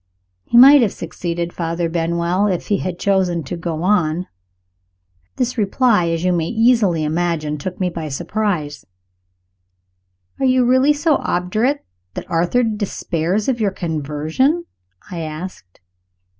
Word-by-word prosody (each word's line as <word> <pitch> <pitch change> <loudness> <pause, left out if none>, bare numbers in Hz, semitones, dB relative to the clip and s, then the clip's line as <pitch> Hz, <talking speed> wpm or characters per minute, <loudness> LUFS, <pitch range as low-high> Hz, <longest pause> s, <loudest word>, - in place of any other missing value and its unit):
"He 235 - +2
might 275 +3 +9
have 220 -5 +1
succeeded, 170 0 -4
Father 170 0 -2
Benwell, 170 +3 0
if 185 -4 -2
he 205 - +2
had 180 -2 -4
chosen 185 -4 +1
to 145 - -5
go 165 -1 -4
on." 180 -3 +1 1.1
This 250 -1 -2
reply, 210 -2 +2
as 165 0 -2
you 180 0 +2
may 165 -2 0
easily 225 -8 +2
imagine, 155 -1 -1
took 180 +5 -6
me 185 - +1
by 160 -2 -5
surprise. 155 -1 -2 1.6
"Are 270 - +1
you 255 -1 +3
really 260 +4 +4
so 295 0 +2
obdurate 215 +11 -1 0.3
that - - -5
Arthur 175 +9 +2
despairs 205 -3 -2
of 245 -4 0
your 205 - +2
conversion?" 160 - -1 0.5
I 175 - -5
asked. 155 - -8
180 Hz, 135 wpm, -19 LUFS, 165-220 Hz, 1.6 s, might